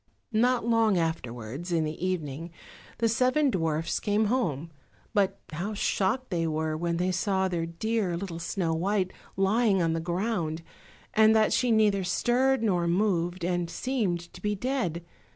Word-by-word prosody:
Not 240 Hz, +1 st, +2 dB
long 225 Hz, -4 st, +3 dB
afterwards, 145 Hz, -1 st, -3 dB
in 165 Hz, -2 st, +2 dB
the 155 Hz, +2 st, -4 dB
evening, 165 Hz, -3 st, -2 dB, 0.5 s
the 230 Hz, -, +2 dB
seven 255 Hz, +5 st, +2 dB
dwarfs 165 Hz, -4 st, -1 dB
came 210 Hz, +1 st, +1 dB
home, 165 Hz, -, -1 dB, 0.4 s
but 200 Hz, -2 st, +1 dB
how 195 Hz, +7 st, -3 dB
shocked 205 Hz, +5 st, 0 dB
they 165 Hz, -2 st, 0 dB
were 155 Hz, 0 st, -1 dB
when 170 Hz, +1 st, -1 dB
they 180 Hz, +2 st, +1 dB
saw 190 Hz, +1 st, +1 dB
their 170 Hz, -2 st, -2 dB
dear 190 Hz, +1 st, -1 dB
little 175 Hz, -2 st, -5 dB
Snow 170 Hz, -1 st, -1 dB
white 185 Hz, +3 st, 0 dB, 0.2 s
lying 200 Hz, +1 st, +3 dB
on 165 Hz, -2 st, +1 dB
the 165 Hz, -, -1 dB
ground, 170 Hz, -2 st, -2 dB, 0.5 s
and 220 Hz, 0 st, +5 dB
that 215 Hz, -1 st, +4 dB
she 250 Hz, -, +2 dB
neither 210 Hz, -3 st, +3 dB
stirred 245 Hz, +7 st, +2 dB
nor 180 Hz, -5 st, +1 dB
moved, 175 Hz, -1 st, 0 dB
and 175 Hz, -1 st, -1 dB
seemed 180 Hz, -7 st, -2 dB
to -, -, -12 dB
be 210 Hz, 0 st, 0 dB
dead. 195 Hz, -, -2 dB
185 Hz, 155 wpm, -28 LUFS, 170-220 Hz, 0.5 s, and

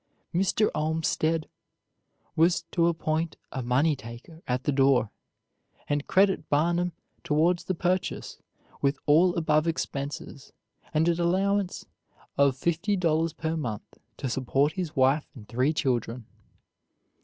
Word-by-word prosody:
Mr. 195 Hz, +4 st, +2 dB
Olmstead 160 Hz, 0 st, 0 dB, 0.9 s
was 170 Hz, +1 st, +3 dB
to 170 Hz, -1 st, +2 dB
appoint 160 Hz, -1 st, -1 dB
a 135 Hz, -, -3 dB
money 135 Hz, +6 st, +2 dB
taker 130 Hz, +6 st, -11 dB
at 125 Hz, +1 st, -1 dB
the -, -, +1 dB
door, 135 Hz, -5 st, +3 dB, 0.8 s
and 145 Hz, 0 st, -1 dB
credit 195 Hz, -4 st, +2 dB
Barnum 170 Hz, +4 st, +1 dB, 0.3 s
towards 170 Hz, +2 st, +2 dB
the 185 Hz, -, -1 dB
purchase 180 Hz, +2 st, -2 dB, 0.4 s
with 140 Hz, 0 st, +1 dB
all 170 Hz, +5 st, +4 dB
above 155 Hz, -1 st, +2 dB
expenses 140 Hz, -3 st, -4 dB, 0.4 s
and 160 Hz, +1 st, +2 dB
an 170 Hz, 0 st, +1 dB
allowance 195 Hz, +2 st, 0 dB, 0.5 s
of 140 Hz, -2 st, +3 dB
fifty 170 Hz, +8 st, 0 dB
dollars 165 Hz, -3 st, +1 dB
per 160 Hz, +1 st, -3 dB
month 120 Hz, -10 st, -5 dB, 0.2 s
to -, -, -3 dB
support 135 Hz, +4 st, +1 dB
his 175 Hz, -3 st, -4 dB
wife 135 Hz, +3 st, +3 dB
and 105 Hz, -5 st, -12 dB
three 130 Hz, +5 st, +1 dB
children. 125 Hz, -5 st, -1 dB
155 Hz, 125 wpm, -27 LUFS, 140-170 Hz, 0.9 s, all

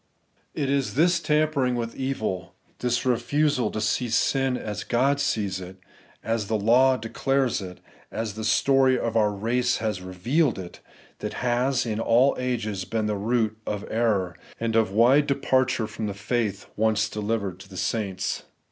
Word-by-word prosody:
It 140 Hz, -, -1 dB
is 140 Hz, -2 st, 0 dB
this 170 Hz, +4 st, +4 dB
tampering 150 Hz, -5 st, +1 dB
with 115 Hz, -1 st, -3 dB
evil, 110 Hz, -9 st, -3 dB, 0.2 s
this 125 Hz, 0 st, 0 dB
refusal 130 Hz, 0 st, +1 dB
to 110 Hz, -, -4 dB
see 115 Hz, +3 st, 0 dB
sin 130 Hz, +2 st, +1 dB
as 105 Hz, -3 st, -5 dB
God 135 Hz, +4 st, +1 dB
sees 100 Hz, -8 st, -1 dB
it, 90 Hz, +1 st, -9 dB, 0.5 s
as 115 Hz, -2 st, -1 dB
the 110 Hz, 0 st, +1 dB
law 125 Hz, +5 st, +4 dB
declares 130 Hz, +2 st, 0 dB
it, 90 Hz, -2 st, -8 dB, 0.3 s
and 110 Hz, -, -6 dB
as 110 Hz, -3 st, -4 dB
the 110 Hz, +1 st, -6 dB
story 130 Hz, +5 st, +3 dB
of 115 Hz, -2 st, -2 dB
our 105 Hz, -2 st, +3 dB
race 120 Hz, +5 st, 0 dB
has 105 Hz, -4 st, -2 dB
revealed 115 Hz, -, 0 dB
it, 90 Hz, -2 st, -8 dB, 0.4 s
that -, -, -4 dB
has 125 Hz, +2 st, +1 dB
in 110 Hz, -2 st, -2 dB
all 120 Hz, +4 st, +4 dB
ages 110 Hz, -6 st, -2 dB
been 110 Hz, +2 st, -2 dB
the 105 Hz, 0 st, 0 dB
root 110 Hz, +1 st, 0 dB
of 105 Hz, -1 st, -3 dB
error, 105 Hz, -6 st, +1 dB, 0.2 s
and 115 Hz, -1 st, -1 dB
of 110 Hz, -3 st, +3 dB
wide 125 Hz, +8 st, +4 dB
departure 130 Hz, -4 st, +1 dB
from 110 Hz, 0 st, -5 dB
the 100 Hz, -, -4 dB
faith 105 Hz, 0 st, -2 dB
once 110 Hz, 0 st, +2 dB
delivered 105 Hz, -3 st, -3 dB
to 95 Hz, -, -13 dB
the 95 Hz, -, -10 dB
saints. 95 Hz, 0 st, -2 dB
115 Hz, 165 wpm, -25 LUFS, 105-130 Hz, 0.5 s, this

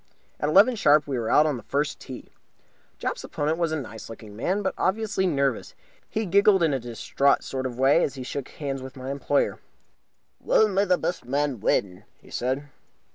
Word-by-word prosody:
At 150 Hz, -, 0 dB
eleven 200 Hz, +9 st, +6 dB
sharp 150 Hz, -7 st, +4 dB
we 135 Hz, -4 st, -2 dB
were 110 Hz, -, -2 dB
out 150 Hz, -, +5 dB
on 150 Hz, -4 st, 0 dB
the -, -, -8 dB
first 145 Hz, +7 st, -2 dB
tee. 130 Hz, -2 st, -10 dB, 0.7 s
Jopp's -, -, -3 dB
opponent 155 Hz, +3 st, -2 dB
was 170 Hz, -2 st, +1 dB
a 160 Hz, -, -1 dB
nice 110 Hz, -5 st, -9 dB
looking 110 Hz, -1 st, -10 dB
young 105 Hz, -, -12 dB
man, 185 Hz, -, -1 dB
but -, -, -1 dB
obviously 195 Hz, -1 st, 0 dB
nervous. 140 Hz, -5 st, -1 dB, 0.3 s
He 220 Hz, -1 st, -2 dB
giggled 200 Hz, 0 st, +4 dB
in 160 Hz, -3 st, +2 dB
a 135 Hz, -, 0 dB
distraught 120 Hz, +4 st, 0 dB
sort 130 Hz, -1 st, -3 dB
of 120 Hz, -2 st, -8 dB
way 135 Hz, +2 st, +4 dB
as 140 Hz, -, -2 dB
he 130 Hz, -, -6 dB
shook 135 Hz, +1 st, -5 dB
hands 135 Hz, -3 st, -5 dB
with 130 Hz, +1 st, -9 dB
my 130 Hz, +1 st, -5 dB
employer. 140 Hz, 0 st, 0 dB, 0.8 s
"Well, 220 Hz, -, +3 dB
may 200 Hz, 0 st, +1 dB
the 180 Hz, -2 st, +3 dB
best 175 Hz, -, -3 dB
man 140 Hz, -1 st, -1 dB
win," 100 Hz, -1 st, 0 dB
he -, -, -19 dB
said. 130 Hz, +3 st, -1 dB
140 Hz, 200 wpm, -25 LUFS, 130-175 Hz, 0.8 s, eleven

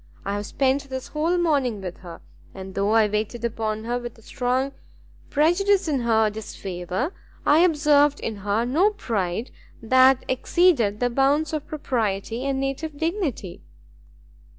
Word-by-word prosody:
I 200 Hz, -, -2 dB
have 205 Hz, 0 st, -3 dB
spent 275 Hz, +1 st, 0 dB
this 260 Hz, -1 st, -5 dB
whole 325 Hz, +4 st, 0 dB
morning 280 Hz, -10 st, +1 dB
with 180 Hz, -2 st, -6 dB
her, 175 Hz, -2 st, -11 dB, 0.3 s
and 190 Hz, 0 st, -8 dB
though 200 Hz, +1 st, 0 dB
I 220 Hz, -1 st, +4 dB
waited 215 Hz, +3 st, -2 dB
upon 220 Hz, -1 st, -2 dB
her 240 Hz, +2 st, -2 dB
with 240 Hz, -1 st, -8 dB
a 225 Hz, -, -19 dB
strong 255 Hz, +4 st, -1 dB, 0.6 s
prejudice 350 Hz, +6 st, +2 dB
in 290 Hz, -4 st, +1 dB
her 220 Hz, -2 st, +2 dB
disfavour, 195 Hz, -, -4 dB, 0.3 s
I 295 Hz, +2 st, +5 dB
observed 295 Hz, -4 st, +4 dB
in 220 Hz, -2 st, -4 dB
her 205 Hz, +3 st, -1 dB
no 320 Hz, +12 st, +3 dB
pride 220 Hz, -, -3 dB, 0.3 s
that 260 Hz, +3 st, +4 dB
exceeded 255 Hz, -, +2 dB
the 245 Hz, 0 st, +1 dB
bounds 285 Hz, +4 st, +2 dB
of 305 Hz, -2 st, -3 dB
propriety 230 Hz, -5 st, -2 dB
and 275 Hz, -1 st, -1 dB
native 275 Hz, +3 st, -3 dB
dignity." 320 Hz, -, -3 dB
250 Hz, 150 wpm, -24 LUFS, 215-295 Hz, 0.6 s, I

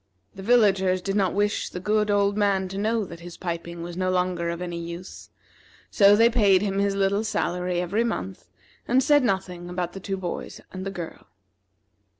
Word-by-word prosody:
The 195 Hz, -, -9 dB
villagers 195 Hz, -4 st, +3 dB
did 195 Hz, +2 st, -3 dB
not 195 Hz, -3 st, +1 dB
wish 205 Hz, +1 st, 0 dB
the 180 Hz, -, -6 dB
good 210 Hz, +2 st, +1 dB
old 200 Hz, 0 st, +2 dB
man 200 Hz, -2 st, +1 dB
to 195 Hz, -, -6 dB
know 220 Hz, +1 st, 0 dB
that 170 Hz, -2 st, -10 dB
his 175 Hz, 0 st, -10 dB
piping 170 Hz, -1 st, -5 dB
was 175 Hz, 0 st, -7 dB
no 185 Hz, 0 st, 0 dB
longer 180 Hz, -2 st, 0 dB
of 170 Hz, 0 st, -4 dB
any 175 Hz, -1 st, -4 dB
use, 170 Hz, +2 st, -8 dB, 0.6 s
so 200 Hz, -1 st, +6 dB
they 225 Hz, +2 st, +6 dB
paid 205 Hz, -5 st, +4 dB
him 195 Hz, -1 st, -1 dB
his 200 Hz, 0 st, +1 dB
little 200 Hz, +2 st, +1 dB
salary 180 Hz, -4 st, -1 dB
every 200 Hz, +6 st, 0 dB
month, 95 Hz, -, -4 dB, 0.4 s
and 255 Hz, +2 st, +3 dB
said 290 Hz, +1 st, +5 dB
nothing 185 Hz, -5 st, -2 dB
about 180 Hz, -1 st, -3 dB
the 195 Hz, -, -7 dB
two 195 Hz, 0 st, -4 dB
boys 180 Hz, -2 st, -5 dB
and 190 Hz, +1 st, -6 dB
the -, -, -1 dB
girl. 175 Hz, -4 st, -8 dB
190 Hz, 190 wpm, -25 LUFS, 180-205 Hz, 0.6 s, so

